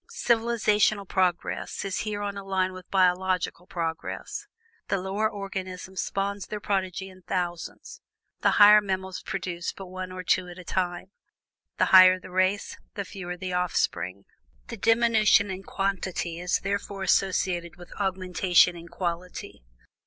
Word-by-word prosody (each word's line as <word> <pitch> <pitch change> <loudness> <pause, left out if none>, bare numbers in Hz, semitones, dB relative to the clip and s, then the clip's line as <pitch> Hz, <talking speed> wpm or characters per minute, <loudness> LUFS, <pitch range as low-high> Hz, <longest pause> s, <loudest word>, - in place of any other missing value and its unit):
Civilizational 215 -3 +2
progress 180 +1 -1
is 195 - -2
here 210 -1 -3
on 200 0 -3
a 200 - -6
line 190 -1 0
with 185 -1 -11
biological 185 -1 +1
progress. 165 -2 -4 0.4
The 195 - +1
lower 195 +3 -1
organisms 190 -2 -5
spawn 200 +1 -2
their 210 - -4
progeny 190 -1 -2
in 185 0 -17
thousands, 175 -2 -4 0.4
the - - +3
higher 210 +1 +9
mammals 190 -2 -3
produce 180 -3 -4
but 195 - -9
one 185 0 -6
or 185 0 -6
two 185 0 +2
at 175 0 -10
a 185 - -9
time. 180 +1 -2 0.7
The - - +4
higher 185 0 +9
the 185 - -12
race, 185 +2 0 0.2
the 200 -2 -3
fewer 180 -2 -6
the 185 0 -4
offspring. 100 - -1 0.4
"Thus - - -7
diminution 225 -3 +4
in 190 0 -5
quantity 190 -4 -2
is 180 0 +1
throughout 200 0 -3
associated 180 -3 +1
with 175 0 -13
augmentation 185 -2 +3
in 170 0 -10
quality. 175 - -5
185 Hz, 145 wpm, -27 LUFS, 180-200 Hz, 0.7 s, higher